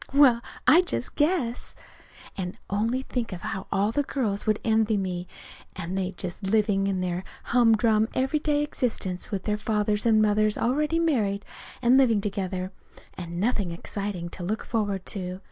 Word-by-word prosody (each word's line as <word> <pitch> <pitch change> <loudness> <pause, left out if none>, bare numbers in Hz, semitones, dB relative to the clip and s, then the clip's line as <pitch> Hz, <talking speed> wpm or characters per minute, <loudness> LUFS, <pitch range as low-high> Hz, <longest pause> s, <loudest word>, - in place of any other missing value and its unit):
Well, 260 -5 +6 0.2
I 340 - +7
just 360 - -4
guess! 295 -6 0 0.6
And 180 -1 -4
only 230 +6 0
think 245 -4 -3
how 195 +2 -5
all 205 +2 +2
the 290 - +1
girls 225 -8 -2
would 215 0 +2
envy 220 -1 +2
me 180 -2 -3 0.5
and 185 0 -4
they 190 -1 0
just 175 +1 -6
living 200 -1 +2
along 190 -2 0
their 180 0 -2 0.2
humdrum, 225 -2 +4
everyday 290 +2 +1
existence 220 -10 -2
with 195 -3 -3 0.2
fathers 210 0 +1
and 220 -1 +5
mothers 215 0 +3
already 300 +7 +1
married 220 -12 +1 0.4
and 250 +3 +6
living 230 -6 +4
together, 190 -2 -3 0.4
and 170 -1 -6
nothing 205 -3 +1
exciting 180 +1 -4
to 175 - -7
look 215 +5 -2
forward 205 -4 -1
to. 185 -2 -5
210 Hz, 150 wpm, -26 LUFS, 190-240 Hz, 0.6 s, I